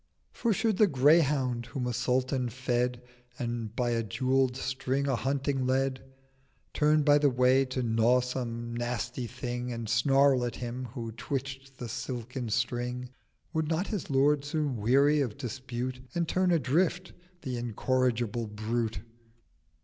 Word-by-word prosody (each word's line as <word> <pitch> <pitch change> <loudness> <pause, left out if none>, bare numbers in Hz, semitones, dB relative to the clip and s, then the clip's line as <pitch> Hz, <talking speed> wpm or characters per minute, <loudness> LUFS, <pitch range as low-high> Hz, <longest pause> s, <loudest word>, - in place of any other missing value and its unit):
'For 235 - 0
should 220 -1 +1
the 215 - +6
Greyhound 135 -5 +3
whom 125 +2 -4
a 125 - -1
Sultan 125 +2 0
fed, 125 0 -1 0.3
And 115 -2 -4
by 120 -1 0
a 115 -1 +1
jewell'd 130 +3 +1
String 130 +1 -1
a 135 - +2
hunting 135 +2 -1
led, 130 0 0 0.7
Turned 150 0 +3
by 145 -1 +6
the 145 -1 +4
Way 130 +1 +4
to 130 0 -3
gnaw 115 +2 +3
some 120 -2 -4
nasty 120 +1 -3
Thing 125 0 -4
And 115 -1 -4
snarl 135 +3 +4
at 120 - -2
Him 125 +1 -5
who 115 -3 -4
twitch'd 135 +3 -5
the 120 - -5
silken 125 +1 -4
String, 125 +2 -2 0.4
Would 160 -1 0
not 165 +4 0
his 205 -6 -4
Lord 140 +1 +3
soon 145 -3 -1
weary 140 +7 +4
of 120 -6 -2
Dispute, 125 +1 -4 0.2
And 170 -1 0
turn 185 +2 +1
adrift 170 +4 +1 0.3
the 125 -2 -3
incorrigible 120 -1 0
Brute? 110 +1 -2
125 Hz, 145 wpm, -29 LUFS, 120-140 Hz, 0.7 s, the